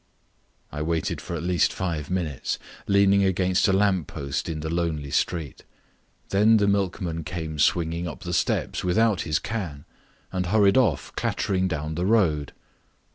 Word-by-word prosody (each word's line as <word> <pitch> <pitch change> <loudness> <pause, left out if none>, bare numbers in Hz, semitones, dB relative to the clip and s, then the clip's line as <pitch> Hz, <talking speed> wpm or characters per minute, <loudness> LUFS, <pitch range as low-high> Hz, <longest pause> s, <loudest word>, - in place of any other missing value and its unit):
I 75 - -5
waited 80 +1 -1
for 85 - -5
at 85 - -4
least 90 -2 +2
five 80 -6 -3
minutes, 85 -7 -2 0.3
leaning 100 0 +4
against 95 0 +2
a - - +3
lamp 95 -4 +2
post 70 +3 -4
in 80 -1 -4
the 80 - -4
lonely 80 -4 -2
street. 80 -4 -1 0.7
Then 105 +3 +5
the 100 -1 +2
milkman 95 -4 -1
came 80 -1 -5
swinging 85 0 +1
up 75 - -7
the - - -4
steps - - 0
without 105 +2 +2
his 75 -2 0
can 90 -11 -5 0.5
and 90 -1 -2
hurried 100 0 +4
off 110 - +1
clattering 95 -1 0
down 80 -3 -3
the 90 +4 -1
road. 85 -10 +2
90 Hz, 155 wpm, -25 LUFS, 80-100 Hz, 0.7 s, Then